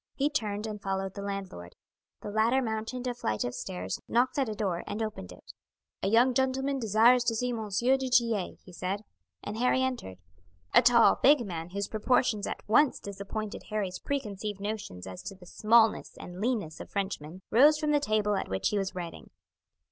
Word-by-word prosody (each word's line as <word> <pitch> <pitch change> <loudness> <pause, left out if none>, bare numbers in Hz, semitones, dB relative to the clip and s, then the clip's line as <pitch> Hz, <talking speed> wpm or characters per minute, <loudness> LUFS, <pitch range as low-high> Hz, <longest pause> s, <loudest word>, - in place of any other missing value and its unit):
He 290 +2 +1
turned 210 -7 -2
and 210 -2 -6
followed 195 -1 -2
the 200 - -6
landlord. 195 - -6 0.5
The 205 - -6
latter 225 +5 +3
mounted 225 +1 -3
a 250 - -1
flight 110 - -2
of 120 - -3
stairs, 185 +5 -5
knocked 250 +4 +1
at 265 -4 +1
a 215 - -4
door, 190 -5 -2
and 210 - -4
opened 215 - -4
it. - - -13 0.5
"A - - 0
young 235 +5 +4
gentleman 265 +2 0
desires 230 +2 +5
to 230 - +1
see 250 +2 -1
M. 220 -3 -4
du 265 +2 +2
Tillet," 230 -6 +1
he 185 - -13
said, 190 +4 -3 0.4
and 210 +2 -5
Harry 250 +1 +3
entered. 245 - -3 0.6
A - - +8
tall, 240 -1 +5
big 275 -3 +5
man, 170 -3 -5
whose 200 +2 -3
proportions 215 -1 +1
at - - -6
once 255 +6 +4
disappointed 200 +2 -6
Harry's 195 -4 -2
preconceived 210 -7 -4
notions 200 - -5
as 95 -1 -8
to 195 - -7
the 185 -1 -15
smallness 220 +4 +3
and 180 +2 -9
leanness 215 -9 -1
of - - -9
Frenchmen, 190 -3 -4
rose 290 +6 +6
from 300 0 0
the 295 - +4
table 215 -5 +1
at 195 - -1
which 95 0 0
he 210 - 0
was 195 -1 -3
writing. 175 -2 -7
215 Hz, 190 wpm, -29 LUFS, 195-245 Hz, 0.6 s, A